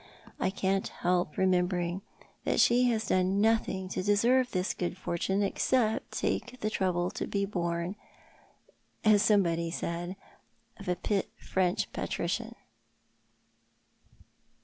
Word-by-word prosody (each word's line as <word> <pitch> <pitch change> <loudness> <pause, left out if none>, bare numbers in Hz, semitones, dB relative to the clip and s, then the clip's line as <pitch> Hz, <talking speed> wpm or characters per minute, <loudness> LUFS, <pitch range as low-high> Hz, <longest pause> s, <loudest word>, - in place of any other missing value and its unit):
I - - +1
can't 195 0 0
help 175 -3 -1
remembering 180 -1 +1 0.4
that - - +1
she 245 +1 +5
has 225 -2 -1
done 185 +2 +2
nothing 210 -3 +1
to 185 - -2
deserve 235 +6 +3
this 185 -1 -1
good 175 0 -3
fortune 190 +3 -1
except 220 +2 +1
take 250 +1 -2
the 215 - -1
trouble 180 -3 0
to - - -4
bo 200 -1 0
born, 170 -1 -2 1.1
as 210 -2 +6
somebody 170 -6 +3
said 170 +2 -3 0.6
of 200 - -11
a 180 0 0 0.4
French 185 -1 0
patrician. - - -2
190 Hz, 115 wpm, -30 LUFS, 180-210 Hz, 1.1 s, as